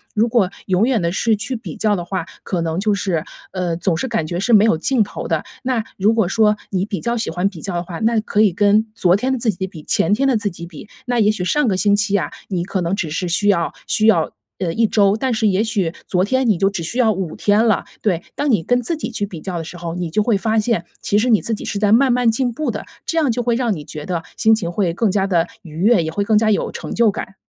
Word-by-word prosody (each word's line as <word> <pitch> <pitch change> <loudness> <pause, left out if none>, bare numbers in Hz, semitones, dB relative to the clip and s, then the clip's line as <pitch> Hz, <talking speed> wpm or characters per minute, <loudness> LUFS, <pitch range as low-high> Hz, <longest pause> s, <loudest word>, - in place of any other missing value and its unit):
如 220 +2 +3
果 225 -6 +2 0.2
永 190 +2 +2
远 245 -5 +1
地 170 - +1
是 220 +3 +1
去 250 +5 -4
比 230 - -7
较 215 -2 +2
的 175 - -3
话， 180 -1 -3 0.2
可 175 -3 -2
能 165 +1 -2
就 210 +1 +1
是， 180 -5 -1 0.3
呃， 180 -3 -2
总 175 -1 0
是 180 - -2
感 225 -9 -1
觉 170 +2 -3
是 200 +5 0
没 210 0 +7
有 220 - +4
尽 235 +7 +2
头 205 - -6
的。 - - 0 0.2
那 250 -3 0
如 205 +3 +3
果 220 -5 +2
说 210 +2 +3
你 190 -2 0
比 200 -4 -4
较 235 +6 -1
喜 230 - -2
欢 180 +3 0
比 180 -6 -7
较 190 -3 -4
的 175 - -1
话， 175 +1 -7
那 225 0 +2
可 210 -1 0
以 210 -3 +5
跟 205 +3 +3
昨 180 -4 +3
天 255 +6 0
的 260 - 0
自 230 -1 +1
己 190 0 -4
比、 160 -4 -11
前 180 - +1
天 275 +4 +1
的 265 - +3
自 210 -2 0
己 170 -1 -9
比。 170 +4 -11 0.2
那 245 -1 0
也 210 -1 +4
许 185 -4 -3
上 295 +6 +2
个 190 - +1
星 205 +1 +3
期 205 0 +1
啊， - - -2 0.2
你 180 -3 -1
可 190 0 -2
能 170 +3 0
只 175 -6 -3
是 180 +3 -2
需 190 +4 +1
要 180 -5 +2 0.2
需 215 - +1
要， 170 -8 +3 0.3
呃， 175 -3 -1
1 230 - +2
周， 205 -2 +3
但 260 +1 -1
是 220 -1 +1
也 200 +1 +2
许 200 -7 -1
昨 180 - +1
天 260 +4 +1
你 205 - +3
就 195 +2 +2
只 195 -4 -4
需 235 +10 -4
要 220 -3 +4
5 185 -4 -4
天 210 +2 +3
了， 220 -3 +2 0.2
对。 180 -6 0
当 290 -1 0
你 210 -8 +3
跟 245 +7 +1
自 320 +7 -2
己 310 - -4
去 205 -3 -2
比 185 -5 -8
较 180 +2 -5
的 165 - -3
时 175 +2 -9
候， 170 -1 -5
你 175 -1 -3
就 190 +7 +1
会 210 -1 +2
发 220 +2 +1
现， 215 -5 0 0.2
其 205 - 0
实 245 +4 +1
你 220 -4 +4
自 230 - -2
己 - - -8
是 200 - -3
在 210 0 +3
慢 260 +2 +5
慢 245 -1 +3
进 245 +2 0
步 285 +4 -3
的， 210 - -4 0.2
这 330 - -2
样 295 -6 +3
就 245 - -1
会 235 -1 +1
让 240 -3 0
你 150 -5 -7
觉 150 -1 -7
得 175 -3 -3
心 220 - +4
情 185 -6 -3
会 175 -3 0
更 220 +3 +1
加 195 0 +1
地 175 -3 +1
愉 170 - -13
悦， 205 -1 +4
也 160 - -3
会 200 +4 -1
更 215 0 +3
加 215 0 +3
有 205 - 0
成 - - -6
就 230 -1 +4
感。 195 - -7
205 Hz, 305 characters per minute, -19 LUFS, 180-225 Hz, 0.3 s, 没